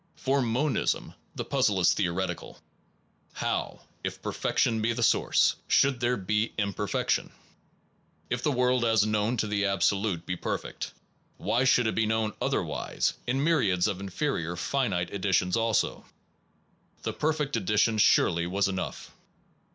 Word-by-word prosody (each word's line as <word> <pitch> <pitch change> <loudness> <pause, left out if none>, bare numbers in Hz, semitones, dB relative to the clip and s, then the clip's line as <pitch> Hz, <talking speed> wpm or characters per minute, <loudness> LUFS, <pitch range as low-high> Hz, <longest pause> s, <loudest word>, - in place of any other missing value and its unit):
For 135 +1 0
monism 130 +5 0 0.2
the - - -4
puzzle 125 -8 +1
is 90 - +4
theoretical: 95 -1 -2 0.8
How - - -3 0.2
if - - -4
Perfection 110 -1 0
be 115 +2 +1
the 120 0 -2
source, - - +3
should 135 -3 +3
there 125 +1 +1
be 105 +3 -1
Imperfection? 100 -1 -1 1.0
If 120 0 -2
the 150 - +1
world 125 -1 +2
as 110 -2 +3
known 110 +3 0
to 110 - 0
the 105 -1 0
Absolute 100 -2 0
be 90 - -2
perfect, - - -4 0.5
why 125 +3 +1
should 125 -2 +4
it 110 - +1
be 115 -1 +1
known 110 -1 0
otherwise, - - -1
in 135 +3 0
myriads 105 - +2
of 100 -3 -1
inferior 95 - -2
finite 90 -2 -1
editions 95 -2 +1
also? 115 -2 0 1.0
The - - -2
perfect 150 -3 -1
edi 105 -1 -1
tion 110 +1 +3
surely 85 -4 +4
was 100 +2 +1
enough. 95 -1 -4
110 Hz, 140 wpm, -28 LUFS, 95-125 Hz, 1.0 s, is